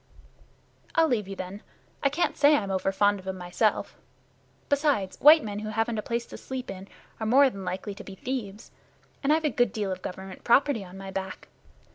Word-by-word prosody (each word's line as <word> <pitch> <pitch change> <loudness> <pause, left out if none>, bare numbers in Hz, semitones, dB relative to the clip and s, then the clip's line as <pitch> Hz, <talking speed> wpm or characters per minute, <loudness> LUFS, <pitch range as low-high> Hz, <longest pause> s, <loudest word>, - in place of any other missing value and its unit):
"I'll 325 -1 +5
leave 225 -8 0
you, 195 - -6
then. 190 +2 -7 0.4
I 280 - +3
can't 315 +6 0
say 295 +1 +5
I'm 200 -7 -1
over 190 0 0
fond 205 +1 +2
of 190 - -13
'em 190 0 -3
myself. 180 +5 -1 0.7
Besides, 285 -10 +1
white 305 +2 +8
men 205 -1 -4
who 215 0 -5
haven't 225 +1 -1
a - - -1
place 235 +2 -2
to - - -10
sleep 260 -1 -5
in 190 +1 -9 0.3
are 220 - -2
more 270 +3 +6
than 195 -3 -8
likely 190 +3 -4
to - - -10
be 195 - -10
thieves, 220 -2 -5 0.5
and 280 - +2
I've 315 +1 +3
a 300 - +2
good 245 -3 +2
deal 205 -2 -2
of 185 - -4
Government 190 +1 -8
property 255 -2 +3
on 185 0 -11
my 195 0 -7
back. 190 0 -6
210 Hz, 205 wpm, -27 LUFS, 195-265 Hz, 0.7 s, white